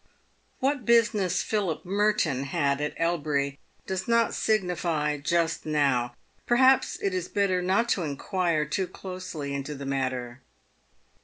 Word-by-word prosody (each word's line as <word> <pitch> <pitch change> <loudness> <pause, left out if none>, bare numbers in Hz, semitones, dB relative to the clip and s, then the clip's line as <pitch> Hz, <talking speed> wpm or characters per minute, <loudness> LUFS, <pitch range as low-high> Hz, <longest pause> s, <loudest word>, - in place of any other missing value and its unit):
"What 275 0 0
business 215 -5 +3
Philip 195 -7 -1
Merton 185 -9 +1
had 140 -1 0
at 150 - -2
Elbury 145 -4 0 0.3
does 190 -1 -3
not 230 -1 +3
signify 170 -7 0
just 165 +2 0
now. 135 -6 +1 0.3
Perhaps 260 +2 +4
it 195 - 0
is 180 -1 -2
better 195 -3 +1
not 190 +6 +2
to 190 - +1
inquire 160 +1 -1
too 185 +5 -1
closely 180 -6 -6
into 140 +2 -4
the 140 0 -7
matter. 130 -2 -3
170 Hz, 130 wpm, -27 LUFS, 140-195 Hz, 0.3 s, Perhaps